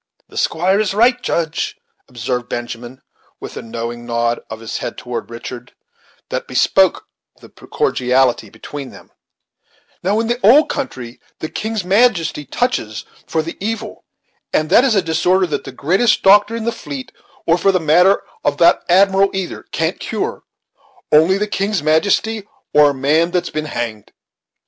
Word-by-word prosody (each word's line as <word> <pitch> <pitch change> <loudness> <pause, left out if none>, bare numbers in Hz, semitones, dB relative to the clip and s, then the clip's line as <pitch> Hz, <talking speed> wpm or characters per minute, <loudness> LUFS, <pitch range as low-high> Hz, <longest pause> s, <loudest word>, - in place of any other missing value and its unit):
"The - - -12
squire 185 +5 +1
is 205 -2 0
right, 245 +3 +3
Judge," 165 -1 -2 0.3
observed 125 -1 -4
Benjamin, 120 +1 -6 0.4
with - - -8
a - - -5
knowing 115 +1 -6
nod 120 0 -1
of 110 - -7
his 115 0 -5
head - - -5
toward 120 -2 -5
Richard, 120 +1 -8 0.6
that - - -3
bespoke - - +2 0.3
the - - -15
cordiality 125 -3 0
between 140 +5 -8
them, - - -15 0.9
"Now, 200 +4 +1
in 230 - 0
the 240 +2 -1
old 265 +10 +6
country, 125 - -5 0.2
the 155 - -5
king's 220 -2 -3
majesty 190 -7 +2
touches 125 - -2 0.2
for 160 - 0
the 165 - -6
evil, 225 +1 -4 0.5
and 155 +2 0
that 235 - +6
is 260 -5 +2
a 195 - +2
disorder 180 +4 +2
that 160 - -3
the - - -7
greatest 190 - +1
doctor 205 +3 +5
in 230 - -4
the 235 - 0
fleet, 140 - -7 0.3
or 170 +2 +3
for 195 - +3
the 185 - +1
matter 175 +5 +4 0.2
of 145 0 0
that 170 +2 +5
admiral 195 +2 +4
either: 190 -2 -5
can't - - -1
cure; - - -3 0.7
only 160 +5 +5
the 210 - 0
king's 200 -4 -1
majesty 200 +7 +1 0.3
or 150 0 +6
a - - -1
man 150 +6 +2
that's 180 0 -2
been 155 0 -3
hanged. 110 -7 -5
165 Hz, 160 wpm, -18 LUFS, 125-200 Hz, 0.9 s, old